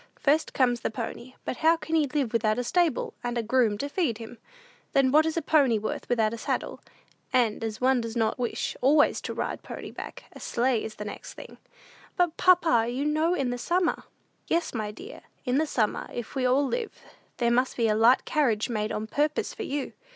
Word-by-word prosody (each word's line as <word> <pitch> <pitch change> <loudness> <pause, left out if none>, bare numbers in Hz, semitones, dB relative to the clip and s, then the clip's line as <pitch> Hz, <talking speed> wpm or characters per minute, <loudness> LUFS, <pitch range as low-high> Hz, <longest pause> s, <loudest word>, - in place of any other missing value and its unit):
First 300 +3 +2
comes 245 -2 +2
the - - -2
pony; 235 +2 -6
but 255 - -3
how 325 +1 +4
can 320 - -7
he 310 -3 +3
live 270 -4 -1
without 220 -1 +2
a 245 - 0
stable, 330 +3 +1
and 245 0 -2
a 235 - 0
groom 230 -2 +2
to 285 - -3
feed 285 - -1
him? 230 +1 -10 0.5
Then 270 -1 +4
what 310 +3 +5
is 320 - -2
a 330 - 0
pony 280 -7 +4
worth 215 +1 -4
without 225 -2 +2
a 230 - -6
saddle? - - -3 0.5
And, 235 -4 +2
as 220 -1 -4
one 255 -1 +3
does 230 0 -5
not 225 +1 0
wish 240 -2 -2
always 290 +3 +4
to - - -4
ride - - -3
pony - - -8
back, - - -8
a - - -11
sleigh 240 -1 0
is 220 - -6
the 210 - -7
next 205 - -8
thing." - - -11 0.6
"But, 350 -2 +2
papa, 330 -11 +4
you 260 +4 -2
know 310 +4 +2
in 265 -7 -1
the 245 - -4
summer!" 350 +7 0 0.4
"Yes, 335 0 0
my 215 -3 -2
dear, 375 - -10 0.2
in 255 +2 +2
the 315 - +1
summer, 220 -7 -1
if 240 -2 -6
we 260 -2 +1
all 270 +3 +3
live, 460 - -4 0.3
there 235 -1 +2
must 250 +2 +1
be 230 -2 +2
a 215 - +3
light 230 +4 +4
carriage 240 -9 +1
made 215 -2 -2
on 215 - -3
purpose 295 +7 -1
for - - -8
you." 280 -1 -3
250 Hz, 215 wpm, -27 LUFS, 230-300 Hz, 0.6 s, what